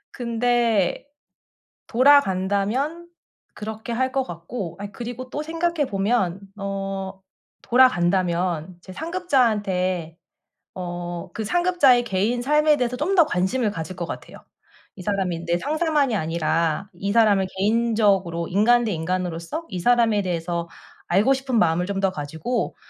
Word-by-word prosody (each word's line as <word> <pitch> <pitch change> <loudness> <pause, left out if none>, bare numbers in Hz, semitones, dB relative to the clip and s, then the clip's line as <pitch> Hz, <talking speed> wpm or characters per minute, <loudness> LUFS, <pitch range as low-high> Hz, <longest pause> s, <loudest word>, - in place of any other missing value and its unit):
근데 235 -3 0 0.8
돌아간다면 255 - +2 0.5
그렇게 220 +2 -6
할 260 +2 0
것 265 0 0
같고, 175 +1 -7
아 205 - -5
그리고 245 +3 -7
또 295 +4 -4
생각해 330 -1 -1
보면 195 -2 0 0.2
어 195 -1 -4 0.4
돌아간다면 180 -7 +2
제 185 - -12
상급자한테 205 - 0 0.6
어 175 -1 -5
그 220 - -4
상급자의 320 - +3
개인 225 +3 0
삶에 300 +2 +3
대해서 250 -1 -1
좀 315 +9 0
더 340 -4 +6
관심을 210 +3 0
가질 165 -1 -6
것 170 -2 -4
같아요. - - -8 0.6
이 185 - -9
사람이 180 -4 -2
내 170 +1 +1
상사만이 300 - +1
아니라 165 +2 -1
이 200 +3 -3
사람을 210 -4 +4
개인적으로 200 -5 +1
인간 235 +6 +3
대 215 - -1
인간으로서 170 - -3
이 185 -3 -5
사람에 230 -2 +3
대해서 170 -1 -3 0.4
알고 200 +9 +3
싶은 265 -3 -1
마음을 175 -1 +2
좀 200 0 -3
더 195 -1 +2
가지고 160 +9 -3
200 Hz, 285 characters per minute, -23 LUFS, 180-245 Hz, 0.8 s, 더